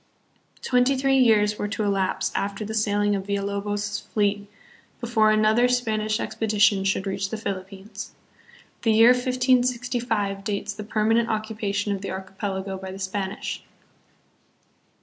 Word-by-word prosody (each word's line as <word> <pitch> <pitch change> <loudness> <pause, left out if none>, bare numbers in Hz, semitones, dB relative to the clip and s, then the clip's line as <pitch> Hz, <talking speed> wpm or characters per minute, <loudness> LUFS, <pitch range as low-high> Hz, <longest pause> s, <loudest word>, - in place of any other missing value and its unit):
119 - - -8
Twenty 250 +2 +3
three 270 0 +3
years 210 -3 +3
were 205 - -1
to 215 +1 -3
elapse 190 -1 0
after 200 +2 -2
the 220 - -5
sailing 205 -1 +1
of 195 0 -4
Villulobos' 205 +1 -2
fleet 205 -1 0 0.5
before 225 -3 +2
another 215 +3 +4
Spanish 220 -3 0
expedition 210 -2 +2
should 195 0 0
reach 195 0 -2
the 220 - -4
Philippines. 195 0 -6 0.7
The 225 - +3
year 225 +3 +7
1565 245 -5 0
dates 205 -1 -3
the 210 - -7
perma 220 +2 +2
nent - - -6
occupation 215 -2 -2
of 195 - -7
the 200 - -5
archipelago 190 0 -4
by 190 0 -7
the 190 - -8
Spanish. 190 0 -4
210 Hz, 140 wpm, -24 LUFS, 200-225 Hz, 0.7 s, year